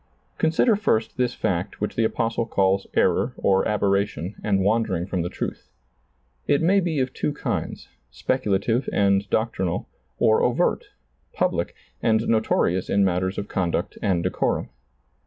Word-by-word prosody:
Consider 165 Hz, +8 st, +3 dB
first 110 Hz, -, 0 dB
this 125 Hz, -1 st, 0 dB
fact 95 Hz, -4 st, -2 dB
which 105 Hz, -, -3 dB
the 115 Hz, -, +2 dB
Apostle 115 Hz, +1 st, -1 dB
calls 95 Hz, -2 st, +1 dB
error -, -, +2 dB
or 95 Hz, -1 st, +2 dB
aberration 100 Hz, -3 st, 0 dB
and 100 Hz, -2 st, +1 dB
wandering 100 Hz, -4 st, +1 dB
from 95 Hz, -2 st, -2 dB
the 85 Hz, -, -2 dB
truth. -, -, -5 dB, 0.8 s
It 140 Hz, -, +3 dB
may 195 Hz, +4 st, +4 dB
be 170 Hz, -5 st, -1 dB
of 130 Hz, 0 st, -2 dB
two -, -, -1 dB
kinds, 145 Hz, -, -4 dB, 0.2 s
speculative 110 Hz, -, 0 dB
and 100 Hz, 0 st, +2 dB
doctrinal, 95 Hz, -6 st, -1 dB, 0.3 s
or 110 Hz, -, +3 dB
overt, -, -, +1 dB, 0.5 s
public, -, -, -1 dB, 0.3 s
and 110 Hz, 0 st, +2 dB
notorious 100 Hz, -5 st, +1 dB
in 100 Hz, 0 st, +3 dB
matters 95 Hz, +1 st, 0 dB
of 100 Hz, -, -3 dB
conduct 90 Hz, -3 st, -2 dB
and 90 Hz, -4 st, +1 dB
decorum. 95 Hz, -, -1 dB
100 Hz, 140 wpm, -24 LUFS, 95-115 Hz, 0.8 s, may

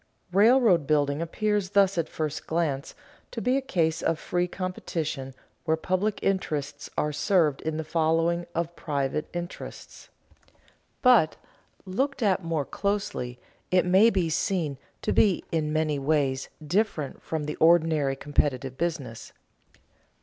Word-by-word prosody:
Railroad 205 Hz, -, +5 dB
building 145 Hz, 0 st, +2 dB
appears 205 Hz, +3 st, -1 dB
thus 195 Hz, -1 st, +3 dB
at 165 Hz, -2 st, -1 dB
first 155 Hz, -1 st, -4 dB
glance 155 Hz, -5 st, -1 dB, 0.3 s
to -, -, -5 dB
be 250 Hz, +1 st, +1 dB
a 275 Hz, -, +1 dB
case 165 Hz, -11 st, 0 dB
of 165 Hz, -, +1 dB
free 175 Hz, +2 st, -1 dB
competition 160 Hz, -7 st, -4 dB, 0.3 s
where 160 Hz, -1 st, +1 dB
public 185 Hz, +5 st, 0 dB
interests 150 Hz, -7 st, -2 dB
are 150 Hz, 0 st, 0 dB
served 150 Hz, -2 st, +2 dB
in 155 Hz, 0 st, -3 dB
the 160 Hz, -, -2 dB
following 165 Hz, +2 st, +1 dB
of 170 Hz, 0 st, -2 dB
private 140 Hz, 0 st, -2 dB
interests. 175 Hz, 0 st, -8 dB, 0.9 s
But, 240 Hz, -, +5 dB, 0.5 s
looked 265 Hz, +8 st, -1 dB
at 190 Hz, -3 st, +2 dB
more 165 Hz, -4 st, -1 dB
closely, 195 Hz, -13 st, -3 dB, 0.3 s
it 180 Hz, 0 st, +3 dB
may 190 Hz, +5 st, +6 dB
be 190 Hz, -6 st, +1 dB
seen 160 Hz, -5 st, -1 dB, 0.2 s
to -, -, +1 dB
be 195 Hz, -5 st, +3 dB
in 155 Hz, -2 st, 0 dB
many 155 Hz, -2 st, 0 dB
ways 135 Hz, -2 st, 0 dB, 0.2 s
different 175 Hz, -4 st, -1 dB
from 160 Hz, -2 st, -3 dB
the 150 Hz, +1 st, -4 dB
ordinary 160 Hz, -4 st, +3 dB
competitive 135 Hz, -2 st, -1 dB
business. 150 Hz, -9 st, -4 dB
165 Hz, 135 wpm, -27 LUFS, 150-185 Hz, 0.9 s, may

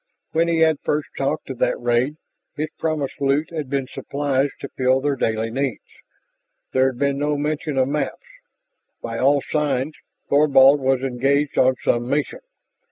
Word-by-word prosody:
When 165 Hz, +1 st, +2 dB
he 165 Hz, -1 st, +1 dB
had 160 Hz, -2 st, +4 dB
first 150 Hz, 0 st, -2 dB
talked 135 Hz, 0 st, -2 dB
of 125 Hz, -, -8 dB
that -, -, +1 dB
raid, 120 Hz, +5 st, +1 dB, 0.4 s
his 155 Hz, +1 st, -2 dB
promised 155 Hz, -5 st, -2 dB
loot 140 Hz, +4 st, +1 dB
had 155 Hz, -5 st, -4 dB
been 135 Hz, -1 st, -1 dB
supplies 140 Hz, +1 st, -1 dB
to 140 Hz, -, -6 dB
fill 130 Hz, 0 st, +2 dB
their 140 Hz, +1 st, 0 dB
daily 115 Hz, -2 st, -1 dB
needs; 135 Hz, -1 st, -2 dB, 0.9 s
there 130 Hz, 0 st, +3 dB
had 130 Hz, -2 st, -3 dB
been 140 Hz, +1 st, 0 dB
no 145 Hz, 0 st, 0 dB
mention 150 Hz, 0 st, -2 dB
of 130 Hz, -1 st, +3 dB
maps. 150 Hz, +2 st, -2 dB, 0.9 s
By 115 Hz, 0 st, -4 dB
all 140 Hz, +2 st, +3 dB
signs 150 Hz, -1 st, -1 dB, 0.3 s
Thorvald 140 Hz, -1 st, +5 dB
was 135 Hz, -1 st, +1 dB
engaged 135 Hz, +3 st, 0 dB
on 130 Hz, 0 st, +4 dB
some 120 Hz, +1 st, +1 dB
mission. 145 Hz, +1 st, -1 dB
140 Hz, 165 wpm, -22 LUFS, 130-150 Hz, 0.9 s, Thorvald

